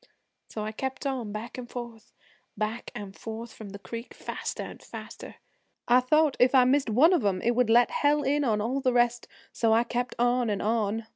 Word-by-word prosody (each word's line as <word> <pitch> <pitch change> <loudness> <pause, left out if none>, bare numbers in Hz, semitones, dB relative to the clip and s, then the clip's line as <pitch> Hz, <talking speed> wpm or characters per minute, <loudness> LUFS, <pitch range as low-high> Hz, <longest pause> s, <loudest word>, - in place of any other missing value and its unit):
So 215 - -5
I 215 - -3
kept 265 +4 -5
on 255 -6 -2
back 220 +4 -6
an' 245 - -7
forth, 235 -3 -8 0.5
back 215 +2 -3
an' 205 -2 -6
forth 225 +3 -8
from 215 -2 -10
the 200 - -8
creek, 230 +4 -8
faster - - -5
an' - - -9
faster. - - -10 0.5
I 245 +1 +6
thought 305 +3 +3
if 250 +2 +4
I 255 - +7
missed 265 0 +2
one 285 - +5
of 340 - +2
'em 195 -2 +1
it 240 - +3
would 245 -1 +1
let 240 +1 +5
Hell 295 0 +2
in 290 +2 +1
on 215 -5 +1
all 255 +6 -1
the 255 -2 +1
rest, 240 0 +2 0.2
so 225 -1 +2
I 230 +1 +4
kept 245 +1 -3
on 245 0 +2
an' 205 -2 -1
on. 220 0 -1
240 Hz, 210 wpm, -27 LUFS, 220-255 Hz, 0.5 s, I